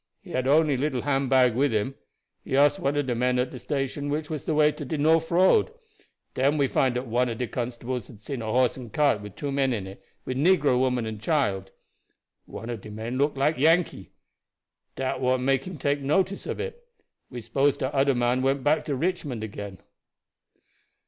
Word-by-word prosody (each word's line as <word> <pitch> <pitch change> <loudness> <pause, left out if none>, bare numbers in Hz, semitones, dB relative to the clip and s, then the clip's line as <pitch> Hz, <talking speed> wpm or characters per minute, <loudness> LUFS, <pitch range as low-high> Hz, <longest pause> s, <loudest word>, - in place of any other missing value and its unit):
He - - -12
had 130 0 -1
only 150 -1 +4
little 135 -2 -1
hand 135 -2 0
bag 130 -3 +4
with 135 +4 +2
him. 110 +4 -1 0.5
He 135 - -1
ask 145 +1 +4
one 140 +1 0
of 145 - +1
de 125 - -1
men 125 +1 +1
at 125 0 0
de 125 - -8
station 140 +1 -3
which 150 +2 -3
was 155 -3 -4
de 160 - 0
way 150 0 +5
to 150 - -8
de 150 +3 -3
norf 160 +2 +3
road. 190 - +4 0.6
Den 140 +4 +2
we 140 -2 +3
find 130 -1 +1
dat 125 +1 -2
one 125 +1 +1
of 115 - -4
de 125 - -1
constables 120 0 -4
hab 110 - -14
seen 120 +3 -6
a - - -5
horse 125 +1 +2
and 125 -4 -9
cart 145 -7 +2
wid 105 -1 -10
two 145 -1 -3
men 135 -2 +1
in 105 -5 -3
it, 95 0 -11 0.2
with 130 - -3
negro 150 -5 +3
woman 125 -2 +1
and 110 -1 -6
child. 105 - 0 0.8
One 115 +2 -7
of 115 -4 -6
de 105 - -10
men 115 +4 -5
look 145 0 +1
like 145 +2 +1
Yankee 160 - +2 0.9
dat 130 0 -2
what 130 0 +2
make 135 +1 +1
him 180 -3 -7
take 145 +1 0
notice 190 +8 0
of - - -4
it. 475 +1 -6 0.5
We 125 - -7
s'pose 135 +5 +1
dat 130 +1 -3
oder 140 -1 +3
man 120 +1 +1
went 135 0 0
back 150 +2 +2
to 145 - -1
Richmond 145 -7 -2
again." 100 -2 -7
135 Hz, 210 wpm, -26 LUFS, 120-145 Hz, 0.9 s, way